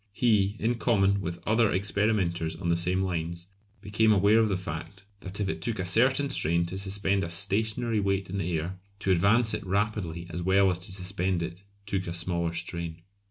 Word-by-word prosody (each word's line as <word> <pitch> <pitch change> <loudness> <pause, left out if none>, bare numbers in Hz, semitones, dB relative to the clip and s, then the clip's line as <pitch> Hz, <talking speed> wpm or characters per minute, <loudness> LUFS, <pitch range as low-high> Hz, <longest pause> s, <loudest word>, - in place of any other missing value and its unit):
He, 105 -3 +2
in 115 +2 -1
common 100 -4 +2
with 85 -1 -4
other 110 0 +3
experimenters 95 -4 0
on 85 +1 -3
the 85 - +3
same 90 +2 0
lines, 85 -1 -4 0.3
became 105 +2 +2
aware 105 +2 +5
of 110 -1 +3
the 95 - 0
fact 100 +1 -7 0.2
that 95 +1 -7
if 100 - 0
it - - -3
took 115 -2 -1
a 95 - -2
certain 130 +9 +2
strain 85 +2 +2
to 90 +2 -5
suspend 100 0 0
a 85 - -3
stationary 110 +5 0
weight 100 -2 0
in 100 +2 -4
the 90 -1 -2
air, 90 +4 -5 0.2
to 95 - +1
advance 105 +6 +3
it - - -2
rapidly 95 -3 -2
as 85 +2 -4
well 95 +2 +4
as 90 - -2
to 90 - -7
suspend 95 -2 -1
it 85 +2 -6 0.2
took 95 -2 -2
a 85 - -4
smaller 85 -1 -2
strain. 85 -1 -5
95 Hz, 200 wpm, -28 LUFS, 85-105 Hz, 0.3 s, aware